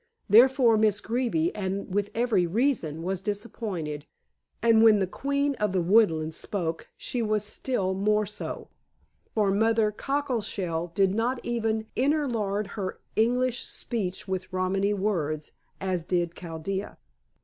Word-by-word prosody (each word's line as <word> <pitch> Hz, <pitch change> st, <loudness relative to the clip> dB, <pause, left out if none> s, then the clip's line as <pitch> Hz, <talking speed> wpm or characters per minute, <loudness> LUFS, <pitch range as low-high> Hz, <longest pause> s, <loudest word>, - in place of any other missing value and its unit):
Therefore 240 Hz, +1 st, +6 dB
Miss 215 Hz, -1 st, +3 dB
Greeby, 255 Hz, -, 0 dB
and 195 Hz, -1 st, -3 dB
with 205 Hz, 0 st, 0 dB
every 225 Hz, -7 st, +2 dB
reason, 175 Hz, -, 0 dB
was 190 Hz, +1 st, -2 dB
disappointed, 195 Hz, -8 st, -4 dB, 0.5 s
and 230 Hz, -1 st, +5 dB
when 220 Hz, -2 st, +7 dB
the 195 Hz, -, +1 dB
queen 280 Hz, +8 st, -1 dB
of 210 Hz, -2 st, 0 dB
the 185 Hz, -, +2 dB
woodland 165 Hz, -5 st, +3 dB
spoke 165 Hz, -1 st, -3 dB
she 245 Hz, -, -2 dB
was 215 Hz, -2 st, 0 dB
still 205 Hz, -3 st, -2 dB
more 210 Hz, +2 st, +2 dB
so, 210 Hz, +1 st, -6 dB, 0.7 s
for 210 Hz, -3 st, +3 dB
Mother 220 Hz, +1 st, +3 dB
Cockleshell 210 Hz, -, -2 dB
did 195 Hz, -1 st, +3 dB
not 240 Hz, +4 st, 0 dB
even 225 Hz, -2 st, -1 dB
interlard 240 Hz, -8 st, 0 dB
her 195 Hz, -3 st, -5 dB, 0.2 s
English 245 Hz, +2 st, +2 dB
speech 190 Hz, -6 st, -4 dB
with 185 Hz, 0 st, -3 dB
Romany 190 Hz, +2 st, +1 dB
words, 160 Hz, -7 st, -1 dB, 0.3 s
as 185 Hz, -3 st, -1 dB
did 175 Hz, -1 st, 0 dB
Chaldea. 175 Hz, +4 st, -5 dB
210 Hz, 130 wpm, -27 LUFS, 185-230 Hz, 0.7 s, when